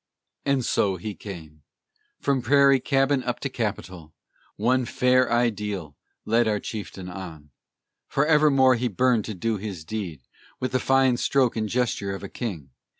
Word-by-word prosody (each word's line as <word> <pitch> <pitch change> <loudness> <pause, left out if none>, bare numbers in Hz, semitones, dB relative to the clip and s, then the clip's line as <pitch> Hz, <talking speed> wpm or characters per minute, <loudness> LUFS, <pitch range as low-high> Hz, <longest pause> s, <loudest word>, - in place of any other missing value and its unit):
And 140 -3 +1
so 100 -2 +1
he 105 +4 -5
came. 80 -7 -10 0.6
From 140 -2 0
prairie 140 +1 +5
cabin 135 +1 +2
up 125 -1 -3
to 140 - -2
Capitol, 95 -9 -5 0.4
One 125 +4 +2
fair 125 +1 +2
Ideal 105 -9 -1 0.3
led 115 +1 +2
our 105 -1 +1
chieftain 100 -4 -7
on. 85 -5 -9 0.6
Forevermore 145 -3 +4
he 125 0 0
burned 120 0 +1
to 110 - -5
do 110 +3 -1
his 95 -5 -6
deed 85 -8 -5 0.4
With 130 - -2
the 130 - +1
fine 135 -1 +3
stroke 130 -1 +2
and 110 -2 -2
gesture 115 -5 -1
of 95 - -9
a 100 - -6
king. 90 - -6
115 Hz, 150 wpm, -25 LUFS, 95-130 Hz, 0.6 s, prairie